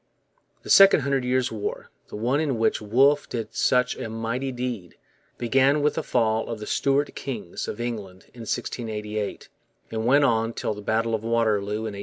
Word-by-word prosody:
The - - -4
Second 195 -5 +8
Hundred 135 -1 0
Years' 125 0 0
War, 110 -2 -5 0.2
the - - -9
one 120 +7 0
in 145 -6 0
which 110 - +1
Wolfe 135 +7 +3
did 115 -2 -5
such 125 -1 +2
a 115 - -5
mighty 115 +4 -3
deed, 120 -8 -5 0.4
began 135 +4 +2
with 150 - +2
the 160 - -2
fall 110 -5 0
of 115 -2 -4
the 105 - -6
Stuart 140 +4 +1
kings 115 -10 -5
of 105 - -5
England 105 -6 -5
in 120 - -11
1688 105 -3 -4 0.4
and 110 +1 -2
went 140 +3 +5
on 115 -3 +1
till 110 - -2
the 105 - -9
battle 115 +2 0
of 110 - 0
Waterloo 110 -2 0
in 110 - -4
1815. 100 - -7
115 Hz, 185 wpm, -25 LUFS, 110-130 Hz, 0.4 s, Second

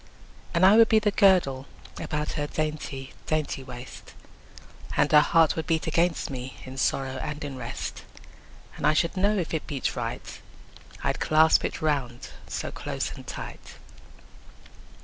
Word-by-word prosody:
And 170 +2 +5
I 200 +3 +7
would 230 -1 +7
be 220 - +5
the 210 -1 +2
girdle 180 -10 +3 0.3
About 150 0 -2
her 145 -1 -2
dainty 150 -4 -4
dainty 155 -3 -1
waist, 125 -1 -10 0.8
And 150 - +3
her 150 - +9
heart 160 +1 +4
would 160 - -4
beat 165 -2 +1
against 165 -1 +1
me, 130 0 -6
In 130 0 -9
sorrow 135 0 0
and 150 -1 -5
in 140 -2 -5
rest: 130 - -5
10 - - -11 0.7
And - - +1
I 155 - +3
should 170 +4 +1
know 200 +3 +2
if 175 -4 -2
it 160 - -2
beat 140 -3 -2
right, - - -5 0.6
I'd - - 0
clasp 155 +1 +4
it - - -3
round 135 -6 -1 0.2
so - - -4
close - - -4
and - - -12
tight. - - -8
155 Hz, 160 wpm, -26 LUFS, 135-170 Hz, 0.8 s, her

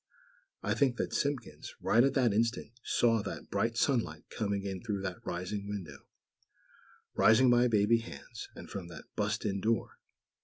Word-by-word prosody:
I - - +1
think 130 -4 +2
that - - -2
Simpkins, 140 -2 -2
right 120 +2 +4
at 135 0 +2
that 125 -6 +3
instant, 115 +1 0
saw 115 -2 +3
that - - -7
bright - - 0
sunlight - - +1
coming 100 -2 -1
in 95 -2 -4
through 105 -4 -3
that 95 -2 -5
rising 95 +3 -4
window; 90 -9 -7 1.1
rising 120 +3 +6
by 120 0 +5
baby 110 0 +4
hands; 115 0 -9
and - - -9
from 95 -4 -6
that 85 - -10
"bust 105 +1 -1
in" 100 -2 -1
door. 115 0 0
110 Hz, 160 wpm, -32 LUFS, 100-115 Hz, 1.1 s, rising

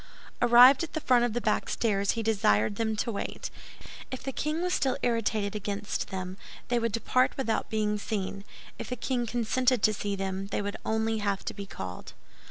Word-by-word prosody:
Arrived 245 +4 +8
at 335 - -6
the 315 - -1
foot 250 -5 +4
of 240 -2 +1
the 240 - 0
back 215 -3 0
stairs, 200 -3 +1
he 230 - -2
desired 200 - +2
them 220 -1 0
to 230 +3 -1
wait. 200 - -5 0.6
If 260 - -6
the 270 - -3
king 305 +5 -2
was 360 0 0
still 265 -7 +1
irritated 220 -3 0
against 205 0 -3
them, 185 -1 -5 0.3
they 240 -1 +2
would 230 -1 0
depart 255 +3 +1
without 240 -5 -1
being 210 -1 0
seen; 200 -1 -3 0.4
if - - -6
the 250 - -2
king 245 0 -1
consented 245 +1 +1
to 215 - +5
see 205 -1 -2
them, 195 0 -3
they - - -2
would 205 0 -4
only 220 0 0
have 200 -2 -1
to - - -3
be 200 -1 -7
called. 90 - -7
220 Hz, 195 wpm, -28 LUFS, 200-245 Hz, 0.6 s, Arrived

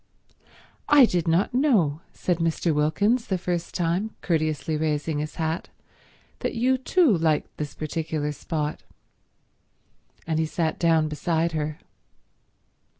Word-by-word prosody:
"I 290 -3 +8
did 175 -6 -1
not 170 +7 +2
know," 210 - +2
said 180 -2 -1
Mr. 165 0 +1
Wilkins 200 +11 +1
the 190 - 0
first 175 -1 -3
time, 180 +5 -1
courteously 155 -2 0
raising 150 0 -1
his 150 0 -4
hat, 160 +1 -2 0.7
"that - - -3
you 255 +3 +2
too 300 - +3
liked 160 -2 0
this 150 -1 -5
particular 155 -1 -3
spot." 150 0 -3 1.4
And 160 -1 -1
he 160 - +1
sat 160 0 -1
down 165 -2 +3
beside 165 +2 0
her. 155 -1 -3
165 Hz, 125 wpm, -25 LUFS, 155-180 Hz, 1.4 s, I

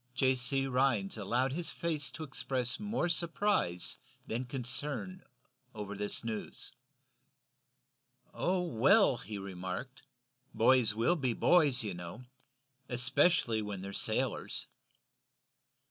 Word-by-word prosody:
John 130 0 +3
C. 135 +2 0
Rhinds 125 -7 +1
allowed 120 +5 0
his 170 +2 -3
face 155 -4 -2
to 160 - -6
express 130 -1 -1
more 210 -3 -1
surprise 170 - 0 0.3
than 120 +3 -3
concern 140 +8 -3 0.5
over 105 -1 -5
this 105 +3 -1
news. 110 -2 -5 1.6
"Oh, 180 0 0
well," 170 - +4
he 105 -2 -7
remarked, 95 +6 -6 0.5
"boys 115 -2 +4
will 115 +10 +3
be 130 -7 0
boys, 145 -4 +4
you 105 -3 -3
know 90 +7 -8 0.7
especially 125 -1 +2
when 105 -3 -5
they're 100 +1 -6
sailors." - - -1
125 Hz, 110 wpm, -32 LUFS, 110-155 Hz, 1.6 s, well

